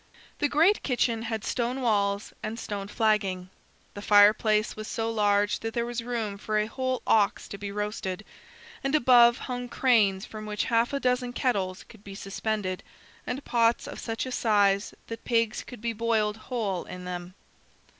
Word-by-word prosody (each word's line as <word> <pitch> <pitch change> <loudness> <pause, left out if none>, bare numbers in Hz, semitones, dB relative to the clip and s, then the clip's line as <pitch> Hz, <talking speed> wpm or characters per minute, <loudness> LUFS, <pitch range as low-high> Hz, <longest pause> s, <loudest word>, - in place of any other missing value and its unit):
The 290 - +1
great 330 +8 +4
kitchen 240 -3 0
had 225 -2 -4
stone 245 +1 -1
walls 200 -4 0
and 220 +1 -4
stone 200 -3 -5
flagging. 195 -4 0 0.4
The 205 - -7
fireplace 210 +1 +4
was 215 0 -7
so 225 0 -2
large 205 -1 +2
that 225 0 -5
there 235 -1 0
was 240 0 -3
room 225 -4 -3
for 215 +1 -1
a 210 - +2
whole 255 +3 -3
ox 205 -2 +2
to 200 - -7
be 200 -1 -5
roasted, 210 -1 -4 0.6
and 275 +2 +1
above 240 -4 +6
hung 245 -1 -5
cranes 210 -8 +3
from 215 -1 -8
which 210 0 -1
half 230 +3 +3
a 280 - -1
dozen 250 -1 0
kettles 195 -8 -1
could 220 -3 -17
be 195 -1 -9
suspended, 195 -1 -3 0.5
and 260 +3 -4
pots 235 -1 +2
of - - -7
such 225 +1 -3
a 255 - -5
size 205 -4 +2
that 230 0 -8
pigs 230 -2 0
could 245 -4 -11
be 235 0 -1
boiled 220 -1 0
whole 215 -6 -3
in 180 0 -8
them. 180 0 -6
220 Hz, 175 wpm, -27 LUFS, 205-240 Hz, 0.6 s, above